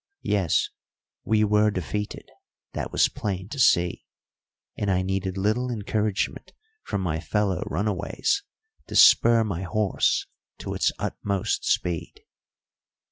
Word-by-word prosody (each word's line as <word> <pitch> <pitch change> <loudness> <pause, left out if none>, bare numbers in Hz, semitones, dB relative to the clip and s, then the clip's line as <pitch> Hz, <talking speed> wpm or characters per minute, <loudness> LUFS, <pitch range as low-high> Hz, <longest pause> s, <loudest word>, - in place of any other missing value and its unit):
Yes, 95 -6 +1 0.5
we 110 0 +2
were 105 0 +3
defeated; 105 +2 -4 0.5
that - - -4
was - - +4
plain 95 -1 -4
to 140 - -6
see, 90 -8 +3 0.7
and 105 - -2
I 95 -1 +2
needed 95 0 -2
little 110 +6 0
encouragement 105 -2 -2 0.3
from 100 - -3
my 80 -4 -1
fellow 95 +4 -1
runaways 105 - -1 0.5
to - - -7
spur 115 -1 +7
my 95 -5 -3
horse 105 +1 +1 0.3
to - - -5
its - - +1
utmost 100 -2 -2
speed. 85 -3 -1
100 Hz, 120 wpm, -25 LUFS, 95-105 Hz, 0.7 s, spur